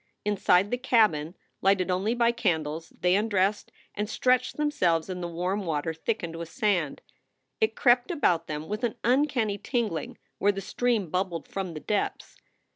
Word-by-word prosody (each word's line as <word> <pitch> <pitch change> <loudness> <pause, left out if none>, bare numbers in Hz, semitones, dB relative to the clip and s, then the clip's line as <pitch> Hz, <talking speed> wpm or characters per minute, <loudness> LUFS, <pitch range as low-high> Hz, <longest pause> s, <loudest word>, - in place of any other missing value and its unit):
Inside 200 -1 +3
the 245 - 0
cabin, 210 - +2 0.3
lighted 190 -1 +2
only 195 +6 0
by 235 -1 +3
candles, 160 -7 -1
they 180 0 +3
undressed 205 -1 +1 0.2
and 210 +1 -3
stretched 255 +2 +1
them 300 0 +1
selves 170 - +1
in 180 0 -5
the 175 - -3
warm 180 +4 -2
water 160 -1 -2
thickened 165 -1 -3
with 165 -1 -6
sand. 200 - 0 0.6
It 220 0 +1
crept 245 -1 +3
about 180 - +1
them 150 +1 -5
with 210 +4 -4
an 240 0 0
uncanny 245 -5 +1
tingling 215 - -2 0.2
where 205 - +4
the 195 - -5
stream 215 -3 -1
bubbled 180 -2 -2
from 190 -4 -4
the - - -4
depths. 205 +5 -2
195 Hz, 165 wpm, -27 LUFS, 170-230 Hz, 0.6 s, where